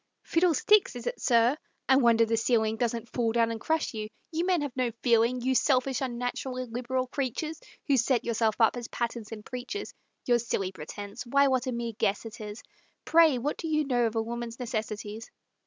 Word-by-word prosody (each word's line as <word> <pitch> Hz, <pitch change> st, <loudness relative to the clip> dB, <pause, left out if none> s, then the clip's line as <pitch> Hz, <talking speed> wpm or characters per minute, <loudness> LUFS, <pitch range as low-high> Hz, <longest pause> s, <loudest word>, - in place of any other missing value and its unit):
"Fiddlesticks, 355 Hz, +2 st, +3 dB
is 240 Hz, -1 st, -7 dB
it, -, -, -3 dB
sir? 240 Hz, +1 st, +4 dB, 0.3 s
I 265 Hz, -, +6 dB
wonder 230 Hz, -3 st, +5 dB
the 225 Hz, 0 st, 0 dB
ceiling 225 Hz, -1 st, +2 dB
Doesn't 235 Hz, -1 st, -2 dB
fall 230 Hz, -2 st, 0 dB
down 230 Hz, -1 st, +2 dB
and 225 Hz, -1 st, -5 dB
crush 320 Hz, -3 st, 0 dB
you 215 Hz, -1 st, -4 dB, 0.2 s
you 330 Hz, +1 st, -1 dB
men 360 Hz, -4 st, +2 dB
have 285 Hz, -4 st, -4 dB
no 255 Hz, -2 st, +1 dB
feeling; 235 Hz, +1 st, +3 dB
You 260 Hz, +2 st, +1 dB
selfish, 260 Hz, -1 st, +2 dB
unnatural, 250 Hz, 0 st, -3 dB
illiberal 255 Hz, +1 st, -2 dB
creatures, 280 Hz, -, -3 dB, 0.2 s
Who 280 Hz, -4 st, +3 dB
set 245 Hz, 0 st, +2 dB
yourselves 225 Hz, -2 st, 0 dB
up 225 Hz, +1 st, +4 dB
as 240 Hz, -1 st, -5 dB
patterns 235 Hz, -2 st, -4 dB
and 215 Hz, -2 st, -8 dB
preachers, 250 Hz, +11 st, -5 dB, 0.3 s
Your 240 Hz, -1 st, +3 dB
silly 195 Hz, -5 st, -2 dB
pretense 200 Hz, +4 st, -8 dB
why, 280 Hz, +2 st, +4 dB
what 260 Hz, 0 st, +1 dB
a -, -, 0 dB
mere 235 Hz, -1 st, -3 dB
guess 200 Hz, +3 st, 0 dB
it 225 Hz, -1 st, -8 dB
is! 210 Hz, 0 st, -7 dB, 0.4 s
Pray, 325 Hz, -5 st, +5 dB
what 280 Hz, +5 st, -2 dB
do 330 Hz, -, -4 dB
you 305 Hz, -1 st, +1 dB
know 245 Hz, -3 st, +2 dB
of 225 Hz, -, -5 dB
a 225 Hz, -, +1 dB
woman's 235 Hz, +1 st, -5 dB
necessities? 220 Hz, -2 st, -4 dB
240 Hz, 195 wpm, -28 LUFS, 225-265 Hz, 0.4 s, I